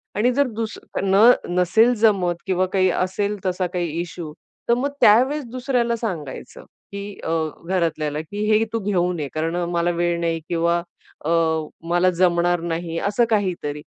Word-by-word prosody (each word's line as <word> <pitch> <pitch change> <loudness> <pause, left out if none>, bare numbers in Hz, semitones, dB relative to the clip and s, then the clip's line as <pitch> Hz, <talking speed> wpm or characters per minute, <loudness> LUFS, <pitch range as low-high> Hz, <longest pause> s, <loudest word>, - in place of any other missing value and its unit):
आणि 225 +5 +2
जर 280 +2 +2
दुस 220 -1 -4 0.3
न 200 +5 +6 0.2
नसेल 220 +7 +4
जमत 190 -6 +3
किंवा 185 -1 +2
काही 185 -1 +3
असेल, 195 +4 -1
तसा 185 0 0
काही 175 -2 -1
इश्यू. 170 -3 -7 0.4
तर - - +6
मग 255 +4 0
त्यावेळेस 260 +8 +5
दुसऱ्याला 245 -2 0
सांगायचं, 165 - -6 0.3
की 200 0 -7
अ, - - -3 0.4
घरातल्याला, 160 -5 -1
की 205 +6 -5
हे 215 +1 +4
तू 230 - 0
घेऊन 180 -4 0
ये, 145 - -2
कारण 160 +2 -2
अ, 175 - -1
मला 170 0 +1
वेळ 170 0 0
नाही 165 -1 -1
किंवा 170 0 +1 0.4
अ, - - -1 0.6
मला 175 +1 +3
जमणार 175 0 +2
नाही, 165 0 -3
असं 205 +4 +1
काही 205 -4 +1
तरी. 150 0 -4
185 Hz, 165 wpm, -22 LUFS, 170-210 Hz, 0.6 s, न